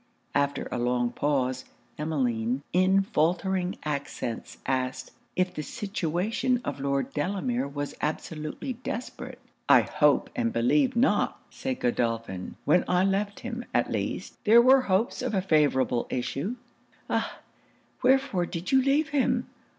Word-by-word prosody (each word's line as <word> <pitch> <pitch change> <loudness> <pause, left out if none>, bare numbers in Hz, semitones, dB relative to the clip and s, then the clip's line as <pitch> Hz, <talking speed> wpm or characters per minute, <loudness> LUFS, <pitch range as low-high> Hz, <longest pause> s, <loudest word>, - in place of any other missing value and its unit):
After 140 0 0
a 125 - -2
long 120 0 +1
pause, 130 -3 0 0.3
Emmeline, 130 -5 -1
in 190 +2 +4
faultering 180 +2 0
accents, 140 -5 -4
asked 130 0 -2 0.2
'if 185 0 +1
the - - -4
situation 200 - -1
of - - -3
Lord 140 0 -1
Delamere 200 - -1
was 145 0 -4
absolutely 155 - -3
desperate?' 245 0 -6 0.3
'I - - +8
hope - - +2
and 240 -2 0
believe 260 +3 +2
not,' 245 +3 +2
said 265 -1 -4
Godolphin. 115 -6 -1
'When 175 +5 +4
I 180 0 +3
left 200 +1 -1
him, 240 0 -5
at - - +2
least, - - -4
there 225 +2 +7
were 260 +2 +7
hopes 205 -1 0
of 250 -4 -1
a - - +3
favourable 140 -8 +2
issue.' 140 - -2 0.5
'Ah! - - -1 0.6
wherefore 260 -9 +3
did 175 0 -5
you 265 0 +6
leave 285 +4 +2
him? 255 -4 +1
180 Hz, 135 wpm, -27 LUFS, -, 0.6 s, I